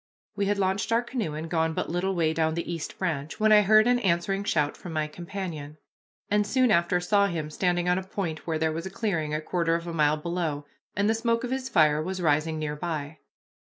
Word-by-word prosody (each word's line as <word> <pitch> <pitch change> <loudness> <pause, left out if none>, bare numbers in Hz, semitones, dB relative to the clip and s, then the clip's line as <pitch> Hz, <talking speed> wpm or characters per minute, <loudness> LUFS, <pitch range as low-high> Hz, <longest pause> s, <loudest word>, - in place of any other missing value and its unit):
We 200 -1 0
had 205 0 +1
launched 195 +2 0
our 230 +1 +3
canoe 230 - -3
and 160 +2 -5
gone 160 -1 0
but - - -2
little 185 +2 -1
way 160 -2 +1
down 160 0 0
the 170 0 -3
East 165 -3 -6
Branch, 155 -5 -3
when 215 0 +4
I 210 0 +8
heard 215 +2 +5
an 245 0 +3
answering 195 -1 0
shout 150 -7 0
from 175 - -9
my 155 -1 0
companion, 165 -3 -6 0.5
and 210 0 +1
soon 255 +1 +3
after 175 -2 +3
saw 200 +3 +3
him 160 -4 -4
standing 175 +1 0
on 180 +1 +3
a - - -6
point 185 -5 -5
where 160 -1 0
there 160 0 +1
was 165 +3 -4
a - - -5
clearing 190 -7 -2
a 155 - 0
quarter 165 0 0
of 170 0 -3
a 170 - -5
mile 150 -1 +3
below, 160 -3 -3 0.3
and 200 +1 +1
the 220 - +3
smoke 230 +1 0
of 250 - -3
his 260 0 -2
fire 155 -7 +4
was 185 +3 -4
rising 160 -1 +1
near 150 -1 -3
by. 155 -1 -4
175 Hz, 235 wpm, -27 LUFS, 155-200 Hz, 0.5 s, I